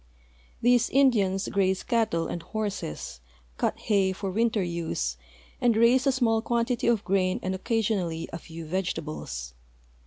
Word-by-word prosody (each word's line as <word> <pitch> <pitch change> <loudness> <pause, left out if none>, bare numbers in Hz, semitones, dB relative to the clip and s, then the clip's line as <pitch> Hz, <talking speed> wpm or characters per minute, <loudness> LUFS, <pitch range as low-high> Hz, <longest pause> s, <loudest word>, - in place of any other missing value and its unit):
These 245 0 +4
Indians 210 -8 +3
graze 190 -1 +1
cattle 220 -8 +1
and 170 - -4
horses» 195 - -4 0.4
cut - - 0
hay 195 -3 +1
for 195 0 -4
winter 220 0 +1
use, 165 - -2 0.5
and 235 -3 +3
raise 250 +4 +4
a - - +5
small 230 -4 +2
quantity 235 +1 0
of 230 -3 +2
grain 185 -1 +1
and 185 - -1
occasionally 190 -5 -1
a 165 - -4
few 165 0 -9
vegetables. 155 - -4
195 Hz, 135 wpm, -27 LUFS, 170-230 Hz, 0.5 s, a